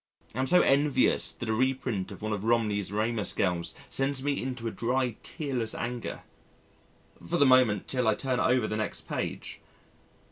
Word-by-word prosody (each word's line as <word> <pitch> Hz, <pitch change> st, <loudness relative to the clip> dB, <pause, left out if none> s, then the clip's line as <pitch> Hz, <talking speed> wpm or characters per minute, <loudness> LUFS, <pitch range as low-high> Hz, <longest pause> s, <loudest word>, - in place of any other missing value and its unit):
I 125 Hz, -, -5 dB
am 130 Hz, -, +1 dB
so 180 Hz, +4 st, +6 dB
envious 140 Hz, -1 st, +3 dB
that 120 Hz, -, -7 dB
a 110 Hz, -, +1 dB
reprint 125 Hz, -5 st, -1 dB
of 100 Hz, -, -10 dB
one 110 Hz, 0 st, -1 dB
of 105 Hz, -1 st, -3 dB
Romney's 105 Hz, -4 st, +1 dB
Ramus 110 Hz, 0 st, 0 dB
girls 85 Hz, -3 st, 0 dB
sends 135 Hz, 0 st, 0 dB
me 145 Hz, 0 st, 0 dB
into 125 Hz, -3 st, -4 dB
a -, -, -2 dB
dry 125 Hz, 0 st, 0 dB
tearless 130 Hz, -8 st, -3 dB
anger 120 Hz, -1 st, -4 dB, 1.0 s
for 85 Hz, -, -1 dB
the 145 Hz, -, +5 dB
moment 130 Hz, -6 st, +4 dB
till 125 Hz, -3 st, 0 dB
I 110 Hz, -, +4 dB
turn 130 Hz, 0 st, -1 dB
over 125 Hz, -3 st, +3 dB
the 105 Hz, -, -2 dB
next 110 Hz, -1 st, -3 dB
page.... -, -, -4 dB
120 Hz, 175 wpm, -28 LUFS, 110-130 Hz, 1.0 s, so